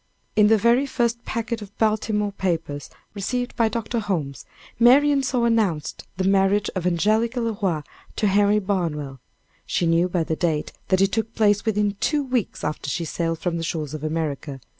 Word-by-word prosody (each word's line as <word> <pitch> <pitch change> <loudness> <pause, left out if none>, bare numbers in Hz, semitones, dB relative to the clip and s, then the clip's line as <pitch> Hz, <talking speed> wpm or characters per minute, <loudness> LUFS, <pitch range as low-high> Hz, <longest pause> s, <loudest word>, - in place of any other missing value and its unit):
In 210 -1 +6
the 220 +1 +5
very 235 +6 +3
first 235 -2 -1
packet 230 0 -3
of 205 -1 -11
Baltimore 215 -1 +1
papers 165 -7 -3 0.2
received 245 +5 -3
by 230 -2 +2
Dr. 230 +1 -2
Holmes, 155 - -3 0.3
Marian 275 +4 +5
saw 255 -2 0
announced 210 -10 0
the 190 - 0
marriage 195 +1 +2
of 180 -2 -1
Angelica 215 +8 +1
Le 230 -2 -1
Roy 170 -6 0 0.3
to 215 - 0
Henry 205 +1 +4
Barnwell. 165 -9 -2 0.5
She 175 - 0
knew 165 +2 +3
by 175 -2 0
the 160 - -2
date, 155 -3 -1 0.2
that 185 0 +2
it 195 0 +3
took 225 +1 -2
place 205 -2 +3
within 210 -2 0
two 300 -2 +1
weeks 250 -6 -2
after 150 -1 -3
she 170 +4 -2
sailed 165 +1 -2
from 170 0 -2
the 165 - -3
shores 155 -3 -3
of 155 -1 -6
America. 155 -3 -3
200 Hz, 180 wpm, -23 LUFS, 165-225 Hz, 0.5 s, In